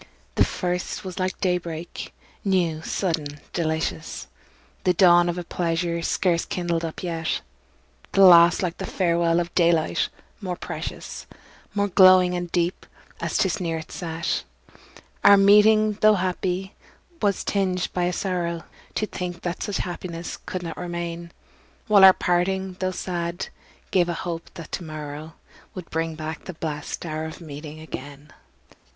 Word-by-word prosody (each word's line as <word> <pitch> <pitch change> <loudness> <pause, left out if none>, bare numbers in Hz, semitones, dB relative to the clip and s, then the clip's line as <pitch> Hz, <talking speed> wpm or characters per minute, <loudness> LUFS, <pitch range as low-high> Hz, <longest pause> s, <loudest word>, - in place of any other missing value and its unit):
The - - +4
first 180 +1 -2
was 185 0 -6
like 185 0 -1
day 180 -2 +2
break, 170 0 -7 0.3
new, 175 -5 +1
sudden, 160 -5 -2
delicious, 160 - -2 0.6
The 180 -1 +3
dawn 175 -1 +6
of 175 - -2
a 175 - -3
pleasure 170 0 -1
scarce 170 0 +1
kindled 170 -2 -2
up 165 +2 -5
yet; 165 -2 -2 0.7
The 195 - +6
last 170 0 +8
like 175 -2 -2
the - - -4
farewell 170 -2 +2
of 175 0 -3
daylight, 170 -2 +2 0.3
more 185 -3 -3
precious, - - -6 0.5
More 205 0 +2
glowing 185 -1 +6
and 175 -1 -3
deep, 175 0 -1 0.3
as - - -1
'tis 190 - +1
nearer 165 -3 -2
its 160 - -13
set. 165 - -2 0.8
Our 200 - +9
meeting, 210 +1 +5
tho' 215 0 +7
happy, 185 +1 -2 0.5
was 200 -2 +1
tinged 185 -3 0
by 180 -1 +1
a 175 - +1
sorrow 175 -3 -2 0.3
To 215 - +1
think 180 -3 -6
that 175 0 -3
such 205 - -2
happiness 175 -1 -5
could 185 -1 -4
not 165 -2 -5
remain; 170 -1 -5 0.5
While 210 -3 +6
our 190 -1 +11
parting, 185 +2 0
tho' 185 - 0
sad, 175 -1 -3 0.4
gave 175 -2 +3
a 170 - -1
hope 170 -1 -5
that 165 -2 -9
to 180 - -3
morrow 155 0 -7 0.4
Would 180 -3 -8
bring 165 0 -1
back 155 0 -6
the 185 - -7
blest 155 0 -4
hour 155 -1 -3
of 160 - -7
meeting 150 -1 -8
again. 145 -1 -9
175 Hz, 150 wpm, -24 LUFS, 165-185 Hz, 0.8 s, our